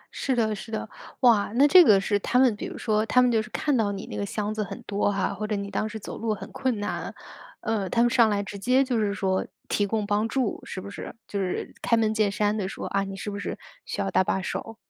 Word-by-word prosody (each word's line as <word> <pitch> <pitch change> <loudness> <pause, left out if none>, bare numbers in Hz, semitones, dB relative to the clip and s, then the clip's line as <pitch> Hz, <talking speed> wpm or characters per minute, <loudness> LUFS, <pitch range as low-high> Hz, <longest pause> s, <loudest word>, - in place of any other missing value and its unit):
是 265 - 0
的 220 -3 +1
是 220 +2 -9
的。 220 - -3 0.3
哇， 230 -6 +4
那 280 +4 +6
这 360 +4 +9
个 210 -10 +6
是 205 +1 +1
他 245 - 0
们 255 -5 +4
比 - - -6
如 - - -8
说， 215 0 +1
他 250 - +4
们 250 - +4
就 225 - +3
是 215 - -9
看 290 +4 0
到 220 -4 +1
你 200 0 -5
那 - - -8
个 - - -2
箱 210 +1 -3
子 215 - -1
很 195 - -7
多 205 0 0
哈， 200 - -1
或 215 - -4
者 210 - -1
你 200 0 -4
当 215 - -1
时 220 - -6
走 - - -7
路 225 -2 0
很 - - -9
困 260 -4 -1
难， 205 - -4 0.5
呃， 210 -4 -1
他 235 - +2
们 240 - +4
上 235 -3 +5
来 205 -1 0
直 200 +1 -7
接 255 +6 +3
就 255 -4 0
是 210 -2 +1
说 190 0 0 0.2
提 205 -1 +1
供 215 0 -1
帮 210 +2 +1
助， 255 -2 -1
是 - - -6
不 200 +2 -8
是？ 165 - -7
就 200 - -3
是 185 -2 -3
开 230 - +2
门 220 -1 +2
见 215 -2 +2
山 210 +1 +1
地 200 -3 -2
说， - - -6
啊， 200 0 0
你 195 0 -6
是 205 +2 -5
不 200 - -5
是 - - -4 0.3
需 - - -5
要 - - -1
搭 - - +4
把 190 0 0
手？ 225 +4 -5
215 Hz, 295 characters per minute, -26 LUFS, 200-230 Hz, 0.5 s, 这